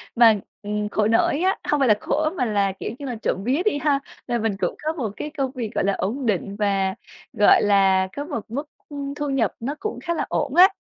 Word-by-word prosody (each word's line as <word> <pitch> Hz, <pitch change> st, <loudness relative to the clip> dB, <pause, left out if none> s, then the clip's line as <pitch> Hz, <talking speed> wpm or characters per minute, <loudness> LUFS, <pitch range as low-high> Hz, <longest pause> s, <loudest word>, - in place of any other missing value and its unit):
Mà, 225 Hz, -3 st, +6 dB, 0.2 s
ừm, 210 Hz, 0 st, -2 dB
khổ 210 Hz, 0 st, +1 dB
nỗi 225 Hz, +6 st, +2 dB
á, 380 Hz, +4 st, +2 dB
không 295 Hz, -, +2 dB
phải 270 Hz, -, +3 dB
là 215 Hz, -, +7 dB
khổ 310 Hz, +6 st, 0 dB
mà 250 Hz, -, +1 dB
là, 200 Hz, -3 st, +1 dB
kiểu -, -, -4 dB
như 285 Hz, -, -6 dB
là, 250 Hz, -3 st, -3 dB
trộm -, -, 0 dB
vía 265 Hz, +8 st, +1 dB
đi 425 Hz, -, +2 dB
ha, 290 Hz, -2 st, +2 dB, 0.3 s
là 240 Hz, -1 st, 0 dB
mình 220 Hz, -2 st, 0 dB
cũng -, -, -1 dB
có 315 Hz, +1 st, 0 dB
một 255 Hz, -9 st, -3 dB
cái 300 Hz, -, -4 dB
công 270 Hz, -2 st, 0 dB
việc, 240 Hz, -5 st, -4 dB
gọi -, -, +1 dB
là, 200 Hz, +1 st, +2 dB
ổn 245 Hz, +9 st, -2 dB
định 200 Hz, -2 st, -1 dB
và, 195 Hz, -2 st, 0 dB, 0.4 s
gọi 210 Hz, -4 st, +5 dB
là, 195 Hz, -2 st, +4 dB
có 285 Hz, -, -4 dB
một 285 Hz, -8 st, -4 dB
mức, 285 Hz, +5 st, -4 dB, 0.2 s
ưm, 280 Hz, -1 st, -5 dB
thu 290 Hz, -1 st, -3 dB
nhập 245 Hz, -7 st, +1 dB
nó 275 Hz, +6 st, -3 dB
cũng 430 Hz, +1 st, -4 dB
khá 340 Hz, -, -1 dB
là 325 Hz, -, -1 dB
ổn 280 Hz, +2 st, -1 dB
á. 365 Hz, +2 st, +9 dB
240 Hz, 250 wpm, -23 LUFS, 210-290 Hz, 0.4 s, á